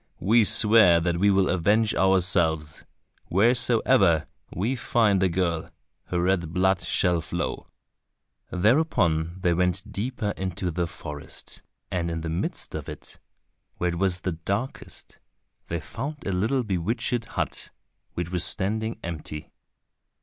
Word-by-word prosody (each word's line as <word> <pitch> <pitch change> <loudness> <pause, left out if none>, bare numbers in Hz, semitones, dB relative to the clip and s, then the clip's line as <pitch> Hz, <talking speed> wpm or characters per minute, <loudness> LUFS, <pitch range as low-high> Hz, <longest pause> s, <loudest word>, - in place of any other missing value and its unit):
We 110 +5 +4
swear 105 -6 +6
that 85 0 -1
we 100 +3 +3
will 95 -1 +3
avenge 105 +5 +2
ourselves!—wheresoever 95 - +2 0.3
we 110 +9 -1
find 110 -5 +2
a 95 - +3
girl, 85 -2 -1 0.4
her 90 - -2
red 85 -2 0
blood 95 +1 +2
shall 90 -3 +1
flow." - - -4 0.8
Thereupon 90 - +1
they 90 -2 +2
went 90 +3 -1
deeper 110 -1 -3
into 95 -1 -3
the 85 +1 -1
forest, 75 -3 -8 0.3
and 85 -2 -1
in 80 -1 -3
the 80 - -4
midst 85 - -3
of - - -6
it, - - -10 0.6
where 90 - 0
it 85 - -5
was 95 -2 +1
the 95 - -2
darkest, 100 +10 -5 0.5
they 85 - -3
found 135 - -7
a 100 - -1
little 110 +8 0
bewitched 110 +4 -1
hut, - - -4 0.5
which 85 0 -4
was 90 -2 +1
standing 110 +5 0
empty. 75 -2 -6
95 Hz, 130 wpm, -25 LUFS, 85-110 Hz, 0.8 s, swear